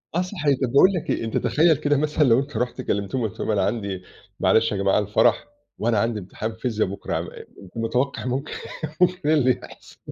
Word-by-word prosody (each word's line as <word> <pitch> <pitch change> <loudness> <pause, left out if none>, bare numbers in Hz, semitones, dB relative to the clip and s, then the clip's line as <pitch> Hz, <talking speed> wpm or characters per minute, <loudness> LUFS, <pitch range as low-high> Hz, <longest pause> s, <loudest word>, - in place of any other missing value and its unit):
آه، 175 - +2
صحيح 155 -7 0
طب 125 - 0
باقول 140 +8 +6
لك 175 - -4
إيه، - - 0
أنت 115 - -2
تخيّل 160 0 +3
كده 145 0 +1
مثلًا 150 +1 +1
لو 120 -2 +5
أنت 140 -3 -4
رُحت 125 +2 -2
كلّمتهم 100 +5 -2
قُلت 100 - -13
لهم - - -1
أنا 100 -2 +1
عندي 100 -5 -2 0.4
معلش 115 0 +3
يا 105 - -1
جماعة 100 +1 +2
الفرح 105 - +2 0.3
وأنا 115 -1 +1
عندي 115 0 0
امتحان 110 +4 -6
فيزيا 110 -2 -1
بُكرا، 95 +1 -4
ع - - 0
م - - -7 0.5
متوقع 125 +5 -1
ممكن 130 +4 -3 0.5
ممكن 180 -4 +2
إيه - - +5
اللي 130 -3 +4
يحصل؟ - - -14
125 Hz, 210 wpm, -23 LUFS, 110-145 Hz, 0.5 s, باقول